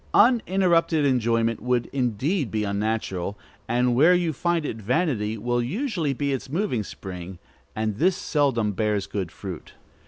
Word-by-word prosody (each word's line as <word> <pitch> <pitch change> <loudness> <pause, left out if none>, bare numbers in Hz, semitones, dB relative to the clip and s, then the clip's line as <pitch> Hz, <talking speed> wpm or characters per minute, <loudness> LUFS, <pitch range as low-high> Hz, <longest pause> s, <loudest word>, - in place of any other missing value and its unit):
Uninterrupted 185 - +4
enjoyment 115 -3 +1
would 125 0 +1
indeed 135 - 0
be 110 -1 -1
unnatural, 100 -2 -2 0.3
and 120 +1 +2
where 155 +9 +6
you 175 -3 0
find 170 +2 0
it 115 - -3
vanity 115 - 0
will 120 +3 0
usually 175 - -1
be 140 +1 -1
its 135 0 -4
moving 155 - -1
spring, 90 -2 -8 0.4
and 110 -1 -1
this 180 +7 +3
seldom 135 - +1
bears 105 -1 0
good 95 -4 -4
fruit. 95 -5 -8
120 Hz, 145 wpm, -25 LUFS, 105-160 Hz, 0.4 s, where